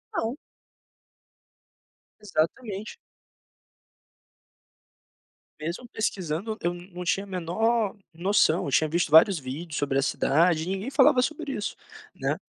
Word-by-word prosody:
Não. 240 -3 -1 1.8
Exatamente. 205 +3 -2 2.6
Mesmo 170 +10 -5
pesquisando, 195 0 -2
eu 175 +1 0
não 180 0 -9
tinha 185 +3 0
a - - -16
menor 200 +5 0 0.2
noção, 175 -1 +2
eu 140 - -3
tinha 155 +4 +3
visto 170 +2 0
vários 165 +4 +7
vídeos 150 +5 -6
sobre 140 -1 0
a - - +3
cidade 160 +4 +2
e - - -6
ninguém 195 +6 -3
falava 275 -2 +5
sobre 310 +2 -2
isso, 210 - -3 0.4
né. - - -1
180 Hz, 115 wpm, -26 LUFS, 160-215 Hz, 2.6 s, vários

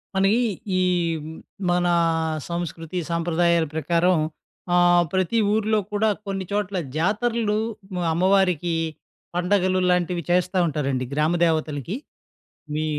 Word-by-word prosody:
మనకి, 195 +4 +3 0.4
ఈ - - +2 0.4
హ్మ్. 160 +1 -8 0.3
మన 175 0 +2 0.6
సంస్కృతి 170 0 -4
సాంప్రదాయాల 170 0 +2
ప్రకారం 170 +4 +2 0.6
ఆహ్, 175 0 +5
ప్రతి 185 +4 +1 0.2
ఊరిలో 215 0 +2
కూడా 215 +1 +2 0.2
కొన్ని 195 -1 -3
చోట్ల 205 -1 -1 0.2
జాతరలు 215 +4 +1 0.6
అమ్మవారికి 180 -1 +2 0.6
పండగలు 185 +1 +2
లాంటివి 180 -1 +1
చేస్తా 180 +1 +1
ఉంటారండి. 140 -4 -1
గ్రామదేవతలకి. 155 - 0 0.8
మీ 155 +1 -1
175 Hz, 95 wpm, -23 LUFS, 165-195 Hz, 0.8 s, ఆహ్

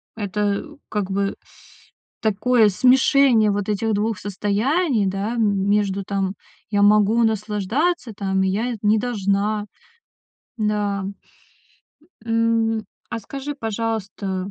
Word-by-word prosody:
это, 205 0 -1 0.2
как 200 -2 -2
бы, 200 +1 -1 0.9
такое 220 +1 +3
смешение 255 0 +4
вот 205 0 -2
этих 215 +2 0
2 210 +1 0
состояний, 215 - 0
да, 195 +5 -2
м 200 -4 +1
между 200 -1 +1
там: 195 -1 -2 0.4
"Я 205 -1 +2
могу 210 +2 +4
наслаждаться 220 - 0
там, 195 -1 -1
и 190 - +1
я 230 +5 -1
не 210 +1 +4
должна". 210 -2 0 0.9
Да. 205 -2 0 1.2
М, 225 -1 +1 0.2
а, - - -4
скажи, 275 +7 -6
пожалуйста 210 -5 -3
210 Hz, 110 wpm, -22 LUFS, 200-230 Hz, 1.2 s, смешение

